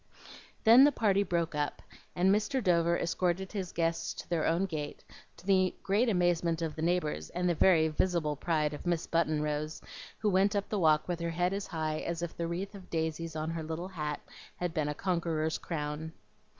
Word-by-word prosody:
Then 235 +4 +9
the 290 - +6
party 205 -6 +2
broke 170 -4 0
up, 150 -1 -2 0.3
and 190 +2 +4
Mr. 215 +6 +1
Dover 170 -2 +3
escorted 180 +2 -1
his 190 -4 -4
guests 165 0 -1
to - - -8
their 170 -3 0
own 170 +4 +2
gate, 155 -5 -5 0.3
to - - -16
the 185 -2 +3
great 215 +5 +2
amazement 175 -3 +1
of 160 -2 -3
the 155 - -5
neighbors 160 - 0
and 180 +1 -1
the 175 - +3
very 165 -1 +4
visible 160 -1 0
pride 150 0 0
of 145 - -7
Miss 170 -2 0
Button 155 -2 +1
Rose, 150 +1 -2 0.4
who 210 -2 +1
went 195 +3 +3
up 200 -1 -1
the 210 - -1
walk 155 -3 +3
with 175 -2 -2
her 170 0 -2
head 175 +3 0
as 200 0 -3
high 155 -1 -2
as 170 0 -3
if 170 - -4
the 170 - -2
wreath 185 +5 -4
of 195 -2 -12
daisies 160 0 -2
on 155 +1 -2
her 165 0 -3
little 160 +3 -5
hat 150 -5 -3 0.4
had 175 -2 -3
been 155 -3 0
a 150 - -3
conqueror's 165 -3 -1
crown. 155 0 -4
170 Hz, 205 wpm, -31 LUFS, 160-185 Hz, 0.4 s, Then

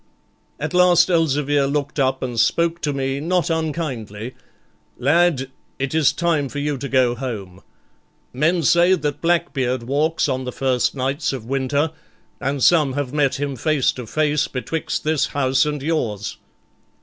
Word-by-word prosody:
At - - -3
last 180 0 +5
Elzevir 145 -4 +2
looked 140 0 -2
up 130 -1 +1
and 120 -3 -3
spoke 170 +6 +1
to 150 - 0
me, 135 0 -2
not 175 +3 0
unkindly, 130 -9 -3 0.6
'Lad, 140 -1 +2 0.3
it 135 +1 -3
is 155 -3 +4
time 160 -5 0
for 145 - -7
you 145 0 -1
to 140 - -5
go 130 -2 +3
home; 105 -8 -6 0.7
men 160 +6 +1
say 175 +5 +5
that 145 -4 -3
Blackbeard 140 -8 0
walks 150 +7 0
on 130 -2 -1
the 125 - -4
first 130 0 0
nights 135 +3 -1
of 125 -5 -6
winter, 135 +4 0 0.5
and 135 -1 -2
some 150 -6 +4
have 140 -1 -3
met 145 -3 +2
him 140 -1 -2
face 145 +2 +1
to 125 -3 -8
face 150 +2 +1
betwixt 155 +5 -3
this 155 -1 +1
house 135 +1 +2
and 150 -2 -3
yours.' 115 -11 -2
140 Hz, 155 wpm, -21 LUFS, 130-160 Hz, 0.7 s, last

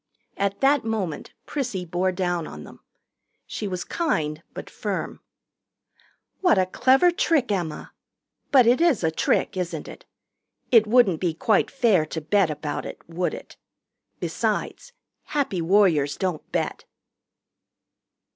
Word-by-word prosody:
At 200 0 -2
that 275 0 +4
moment 210 -8 -3
Prissy 240 -11 -3
bore 180 +2 0
down 175 -2 -2
on 75 0 -9
them. - - -13 0.7
She 210 - -5
was 180 -2 -3
kind 155 - -1
but - - -7
firm. - - -4 1.2
"What 360 - +4
a 185 - +3
clever 265 - +4
trick, 310 -8 +1
Emma! 175 -6 -3 0.6
But 260 -4 +6
it 245 +6 +4
is 330 - +3
a 160 - +2
trick, 160 - 0
isn't 180 -2 -4
it? - - -11 0.7
It 225 -3 +6
wouldn't 215 -8 +4
be 170 -3 0
quite 210 +5 +2
fair 220 - +2
to 160 - -4
bet 180 +3 +2
about 150 0 -4
it, - - -8
would 175 +2 -2
it? - - -12 0.6
Besides, - - -2 0.3
Happy 270 - -1
Warriors 165 -6 +3
don't 180 -5 -3
bet." - - -2
190 Hz, 135 wpm, -24 LUFS, 165-245 Hz, 1.2 s, But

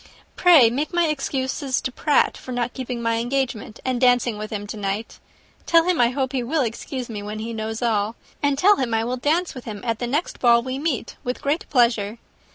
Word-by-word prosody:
Pray 310 -11 +6
make 285 +5 -2
my 345 -1 +4
excuses 270 -2 -1
to 255 - -3
Pratt 290 +3 +2
for 255 - -9
not 245 -1 -2
keeping 250 -2 -5
my 230 0 +1
engagement, 240 -3 -2
and 255 -1 -1
dancing 245 -2 +3
with 215 0 -6
him 205 -1 -4
to 205 - -6
night. 205 +2 -4 0.5
Tell 335 -1 +5
him 355 -5 +2
I 235 - +5
hope 260 0 -2
he 265 -2 -1
will 280 +5 0
excuse 245 +2 -4
me 215 -3 -6
when 210 +1 -6
he 225 +2 -5
knows 220 +1 -4
all, 220 -1 0 0.3
and 285 -1 +1
tell 400 +7 +5
him 235 -4 0
I 225 - +1
will 245 +2 -2
dance 320 +7 0
with 255 - -9
him 210 -3 -6
at 230 -2 -1
the 245 - -2
next 295 +8 -2
ball 235 -1 +5
we 260 +1 -4
meet 290 -6 -2
with 250 +1 -3
great 310 +8 -1
pleasure. 235 -5 +2
245 Hz, 220 wpm, -23 LUFS, 225-275 Hz, 0.5 s, Pray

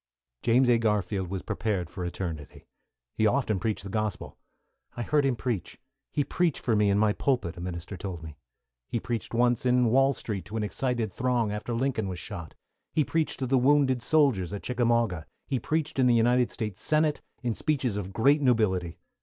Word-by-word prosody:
James 125 +2 +4
A. 120 -1 +4
Garfield 100 -4 0
was 95 -1 -4
prepared 100 -6 -2
for 90 +1 -7
eternity. 85 -4 -5 0.5
He 110 - +2
often 110 -4 +1
preached 110 -3 -2
the 100 - -7
Gospel. 105 -3 -3 0.6
"I 120 - -2
heard 145 +2 +2
him 130 - +1
preach, 115 -6 -3 0.3
he 145 - +1
preached 170 +1 0
for 115 - +1
me 105 -1 +3
in 100 - +3
my 105 0 +3
pulpit," 110 -10 0
a 85 - -8
minister 90 +1 -5
told 90 -3 -6
me. 80 -2 -9 0.5
He 120 - -2
preached 115 -2 -4
once 120 0 +2
in 125 0 +3
Wall 135 +2 +4
Street 100 -4 -4
to 110 +4 -5
an 110 - -1
excited 120 -1 -2
throng, 120 -2 0
after 105 +3 -3
Lincoln 120 -4 0
was 90 - -4
shot. 85 -2 -8 0.4
He 155 - +2
preached 160 +1 -1
to 130 - -2
the 130 +1 +3
wounded 130 -1 +3
soldiers 125 - +2
at 100 - -5
Chickamauga. 115 -8 +1 0.2
He 130 - -1
preached 155 +2 -2
in 130 - +5
the 120 - +5
United 120 +2 +3
States 105 -5 -5
Senate, 155 -1 +1 0.2
in 120 -2 0
speeches 130 -5 -1
of 100 -2 -4
great 140 +8 +3
nobility. 95 - +1
115 Hz, 190 wpm, -28 LUFS, 100-130 Hz, 0.6 s, in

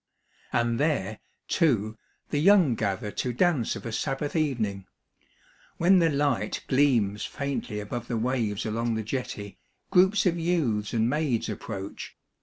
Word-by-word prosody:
And 120 0 +1
there, 125 -9 0 0.3
too, 115 - +1 0.4
the 145 - +1
young 180 -5 +5
gather 105 -1 -2
to 125 - -2
dance 150 -4 +1
of - - -8
a 115 - -3
Sabbath 135 +6 -2
evening. 110 - -1 0.9
When 185 +3 +5
the 165 -1 +4
light 140 -7 0
gleams 120 -7 +2
faintly 140 -7 -3
above 115 +3 -5
the 120 - -2
waves 115 -4 -1
along 115 +1 -1
the 110 - -2
jetty, 105 -4 -5 0.3
groups 190 +2 +4
of 175 -2 +2
youths 145 -12 0
and 115 -1 +1
maids 135 -4 0
approach. 100 -2 -6
120 Hz, 140 wpm, -27 LUFS, 110-150 Hz, 0.9 s, young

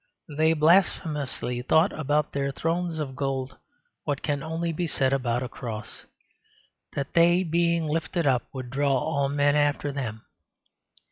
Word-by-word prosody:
They 160 +2 +4
blasphemously 150 -6 +1
thought 160 +8 +3
about 150 0 0
their 140 0 -1
thrones 165 +3 -2
of 140 -4 -4
gold 135 -1 -3 0.5
what 145 -2 -2
can 145 -2 -1
only 165 +2 -2
be 170 +2 -2
said 135 -3 +1
about 125 -2 0
a - - -3
cross 115 -4 -7 0.9
that 140 -1 -3
they, 175 +2 +5
being 170 -1 +1
lifted 165 +2 -1
up, 130 -3 +2
would 130 -2 -7
draw 140 0 +2
all 140 0 0
men 145 0 +2
after 145 -1 +1
them. 115 -6 -5
145 Hz, 145 wpm, -26 LUFS, 135-160 Hz, 0.9 s, they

